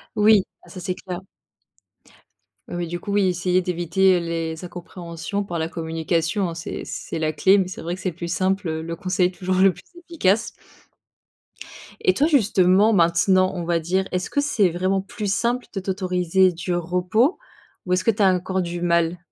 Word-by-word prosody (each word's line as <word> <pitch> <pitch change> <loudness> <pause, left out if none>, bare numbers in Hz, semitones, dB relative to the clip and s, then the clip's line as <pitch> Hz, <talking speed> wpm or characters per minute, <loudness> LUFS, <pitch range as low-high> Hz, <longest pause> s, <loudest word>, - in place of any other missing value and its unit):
Oui, 210 -1 +5 0.2
ah - - -19
ça 185 - -9
c'est 185 +1 -2
clair. 185 0 -7 1.5
Oui, 175 -1 -3
du 175 +1 -4
coup, 200 - -5
oui, 200 -2 +3
essayer 180 0 +1
d'éviter, 180 +2 +2
heu, 175 - +1
les 165 0 -4
incompréhensions 175 +2 -6
par 175 -4 -4
la 160 - -1
communication, 165 +3 -1
hein, 165 - -5
c'est 165 - -6
c'est 165 - -5
la 155 -1 0
clé, 190 +6 +4
mais 190 -2 +1
c'est 185 - -8
vrai 170 +2 -3
que 185 - -13
c'est 185 -3 -2
plus 170 0 -6
simple, 190 0 0
heu, 160 0 -3
le 165 +1 -5
conseil 185 +1 0
toujours 185 0 -2
le 190 0 +5
plus - - -16 0.2
efficace. 230 - 0 1.5
Et 185 - +3
toi, 290 +10 +2
justement, 210 - +4
maintenant, 185 +1 +3
on 175 - -3
va 170 0 +1
dire, 185 +4 0
est-ce 180 0 -2
que 285 - +1
c'est 215 -10 +2
vraiment 185 +3 0
plus 205 0 -3
simple 240 +3 0
de 195 - -2
t'autoriser 185 -1 +1
du 175 +1 -4
repos 180 - +1 0.5
ou 180 - 0
est-ce 185 0 +1
que 225 - +4
tu 205 0 0
as 190 -1 +5
encore 185 +1 -1
du 175 0 -4
mal? 170 0 +1
185 Hz, 190 wpm, -22 LUFS, 170-195 Hz, 1.5 s, Oui